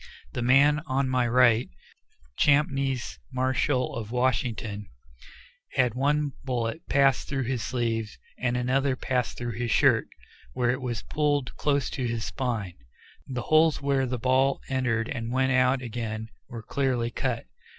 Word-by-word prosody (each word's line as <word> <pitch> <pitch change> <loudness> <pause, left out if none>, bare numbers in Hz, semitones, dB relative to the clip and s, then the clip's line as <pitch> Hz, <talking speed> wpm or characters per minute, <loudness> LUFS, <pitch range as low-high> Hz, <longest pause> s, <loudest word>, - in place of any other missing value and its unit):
The - - -3
man 140 +5 +5
on 135 -1 0
my 125 -1 +2
right, 120 -1 +4 0.7
Champneys 135 - +1
Marshall, 130 0 0
of 110 -2 -5
Washington, 115 -4 -1 0.9
had 125 -3 +2
one 145 +3 +1
bullet 125 +2 -2
pass 135 -1 +3
through 135 -1 -2
his 125 -1 -2
sleeve, 115 -3 -2 0.2
and 125 -1 0
another 130 +2 +1
pass 125 -1 -1
through 120 -1 -4
his 120 -1 -1
shirt, - - +4 0.5
where 125 -1 +1
it 130 +2 -3
was 120 -3 -3
pulled 145 -3 0
close 140 -2 +1
to 130 -3 -2
his 115 -2 -2
spine. 115 -9 -3 0.5
The 125 -2 -4
holes 155 0 +4
where 140 -1 +1
the 125 0 -2
ball 130 +3 +2
entered 120 -4 0
and 115 -4 -4
went 130 +1 +2
out 130 0 +3
again 110 -2 -4 0.2
were 115 -2 -7
clearly 125 -2 -1
cut. - - -2
125 Hz, 145 wpm, -27 LUFS, 120-135 Hz, 0.9 s, man